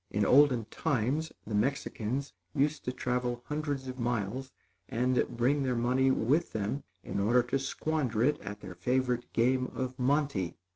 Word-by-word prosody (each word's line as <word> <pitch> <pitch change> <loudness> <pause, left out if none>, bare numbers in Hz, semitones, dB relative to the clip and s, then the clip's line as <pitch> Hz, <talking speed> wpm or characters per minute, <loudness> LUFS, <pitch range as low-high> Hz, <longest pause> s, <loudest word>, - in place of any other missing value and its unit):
In 105 0 +1
olden 130 -3 +5
times, 145 +2 0
the 105 - -6
Mexicans 130 +2 -1 0.2
used 145 +2 +1
to 125 - 0
travel 125 -1 -2
hundreds 145 -3 -3
of 130 0 -6
miles, 120 +2 -2 0.4
and 125 +1 +2
bring 135 +5 +2
their 130 -2 0
money 125 +3 +2
with 135 +7 +2
them 110 +6 -2 0.2
in - - -3
order 120 +5 +4
to 125 +3 -1
squander 135 -5 -1
it 150 +3 +2
at 105 +1 -7
their 95 -2 -8
favorite 125 +5 0
game 125 +2 +2
of 130 0 -3
monte. 130 - +1
125 Hz, 155 wpm, -31 LUFS, 115-140 Hz, 0.4 s, olden